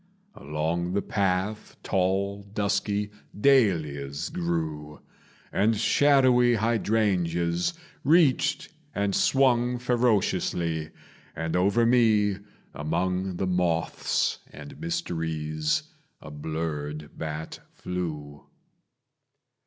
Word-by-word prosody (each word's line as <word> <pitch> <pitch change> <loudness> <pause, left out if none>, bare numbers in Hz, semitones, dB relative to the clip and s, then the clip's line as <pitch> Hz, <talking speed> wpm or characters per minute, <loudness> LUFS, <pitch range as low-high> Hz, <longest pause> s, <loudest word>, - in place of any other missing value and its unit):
Along 80 +4 -2
the 100 - +1
path 100 +1 -1
tall 95 +2 0
dusky 100 0 -1 0.3
dahlias 80 - +2
grew, 80 -3 -3 0.5
And 110 +2 +2
shadowy 125 0 +4
hydrangeas 100 - +1 0.3
reached 150 -2 +3 0.3
and 100 -1 0
swung 125 -2 +3
Ferociously; 105 -9 0 0.5
and 80 0 -3
over 100 +6 +3
me, 110 -5 +3 0.4
among 90 +5 -1
The 95 - -1
moths 90 -3 0
and 70 +1 -11
mysteries, 80 - -2 0.4
a 75 - -11
blurred 75 0 -5
bat 80 0 -5
flew. 75 -5 -6
90 Hz, 80 wpm, -26 LUFS, 80-110 Hz, 0.5 s, shadowy